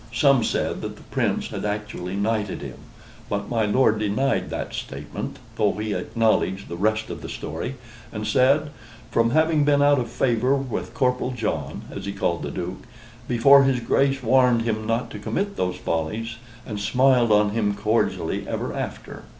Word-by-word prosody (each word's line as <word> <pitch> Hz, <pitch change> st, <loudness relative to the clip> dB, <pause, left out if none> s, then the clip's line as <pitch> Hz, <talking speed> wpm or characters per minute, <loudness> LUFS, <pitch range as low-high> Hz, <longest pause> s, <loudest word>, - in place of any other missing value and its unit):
Some 130 Hz, +1 st, +4 dB
said -, -, -1 dB
that -, -, -5 dB
the -, -, -15 dB
Prince -, -, -1 dB
had -, -, -5 dB
actually 105 Hz, -3 st, -3 dB
knighted 105 Hz, 0 st, -1 dB
him, -, -, -8 dB, 0.5 s
but 100 Hz, +2 st, -3 dB
my 115 Hz, -3 st, +1 dB
lord 110 Hz, 0 st, +3 dB
denied 105 Hz, -1 st, 0 dB
that -, -, -4 dB
statement, 70 Hz, +2 st, -6 dB, 0.2 s
though 105 Hz, -1 st, +2 dB
he 105 Hz, 0 st, -3 dB
acknowledged 110 Hz, -4 st, 0 dB
the 85 Hz, -, -4 dB
rest 110 Hz, +4 st, 0 dB
of -, -, -7 dB
the -, -, -7 dB
story, 85 Hz, -, -5 dB, 0.4 s
and 105 Hz, -1 st, -4 dB
said: 140 Hz, +5 st, +3 dB, 0.4 s
"From 115 Hz, 0 st, +3 dB
having 155 Hz, +2 st, +3 dB
been 145 Hz, -1 st, +4 dB
out 145 Hz, -1 st, +5 dB
of 120 Hz, -2 st, -3 dB
favor 125 Hz, +2 st, +2 dB
with 120 Hz, -10 st, -4 dB
Corporal 125 Hz, -1 st, +1 dB
John," 80 Hz, -, -3 dB
as 100 Hz, -, -6 dB
he 100 Hz, -, -3 dB
called 100 Hz, -, -1 dB
the -, -, -4 dB
Duke, 90 Hz, +2 st, -5 dB, 0.5 s
"before 135 Hz, +4 st, +7 dB
his 135 Hz, -2 st, +2 dB
Grace 135 Hz, +3 st, +1 dB
warned 125 Hz, -1 st, +4 dB
him 110 Hz, -1 st, -2 dB
not 115 Hz, +2 st, -1 dB
to 105 Hz, -, -7 dB
commit 200 Hz, -, -2 dB
those 90 Hz, 0 st, -1 dB
follies, 110 Hz, +9 st, -3 dB, 0.3 s
and 105 Hz, -3 st, -5 dB
smiled 125 Hz, +2 st, +3 dB
on 105 Hz, 0 st, +4 dB
him 105 Hz, -2 st, 0 dB
cordially 110 Hz, +3 st, 0 dB
ever -, -, -3 dB
after." -, -, -6 dB
115 Hz, 175 wpm, -24 LUFS, 105-130 Hz, 0.5 s, before